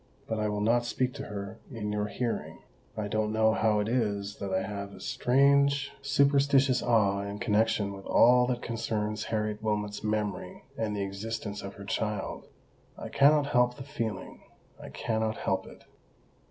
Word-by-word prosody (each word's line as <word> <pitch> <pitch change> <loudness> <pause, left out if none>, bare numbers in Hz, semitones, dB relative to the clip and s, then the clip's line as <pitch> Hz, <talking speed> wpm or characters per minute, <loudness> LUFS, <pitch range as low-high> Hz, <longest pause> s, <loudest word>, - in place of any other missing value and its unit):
"But 110 -1 -2
I 105 0 0
will 105 0 -2
not 120 +3 +3
speak 125 +1 -1
to 140 -1 -6
her 100 +1 -6
in 105 -4 -4
your 105 0 -1
hearing. 120 +2 -3 0.4
I 105 -1 -2
don't 110 +1 0
know 110 0 +3
how 110 -1 +2
it 105 - -2
is 105 -4 -1
that 100 -1 -4
I 95 0 +1
have 100 0 -5
a - - -12
strange 140 +5 +3
superstitious 140 -1 +3
awe 100 -4 +2
in 100 0 -5
connexion 105 -2 +1
with 95 0 -10
all 125 +1 +5
that 125 -1 -2
concerns 105 -2 -2
Harriet 105 -1 -2
Wilmot's 105 -1 -2
memory 105 -2 -2
and 105 -2 -2
the 100 - -1
existence 105 +1 -5
of 100 0 -8
her 100 - -9
child. 105 -1 -3 0.5
I - - -7
cannot 145 +1 +5
help 125 -2 +2
the 135 - -8
feeling—I 115 -8 -7
cannot 110 -1 -2
help - - -1
it." - - -14
110 Hz, 165 wpm, -29 LUFS, 105-125 Hz, 0.5 s, all